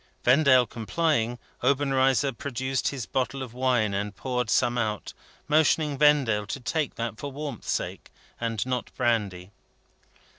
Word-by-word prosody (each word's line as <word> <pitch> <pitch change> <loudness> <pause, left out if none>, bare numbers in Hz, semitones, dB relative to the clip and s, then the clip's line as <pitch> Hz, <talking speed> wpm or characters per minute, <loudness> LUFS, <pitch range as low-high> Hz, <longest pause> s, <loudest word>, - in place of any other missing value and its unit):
Vendale 130 -1 +5
complying, 120 0 -1 0.2
Obenreizer 135 -1 +2
produced 130 +1 -2
his 130 -5 -3
bottle 135 +1 -2
of 120 -3 -9
wine, 125 -5 +1
and 100 +1 -3
poured 125 -1 -2
some 120 +1 +2
out, 110 -3 -2 0.3
motioning 150 0 +3
Vendale 135 -8 +3
to 135 - -4
take 145 +4 -2
that 115 -2 -4
for 145 - -5
warmth's 140 -4 -6
sake, - - -3 0.3
and 115 -2 -2
not 125 -2 -2
brandy. 100 -7 0
125 Hz, 135 wpm, -26 LUFS, 115-140 Hz, 0.3 s, Vendale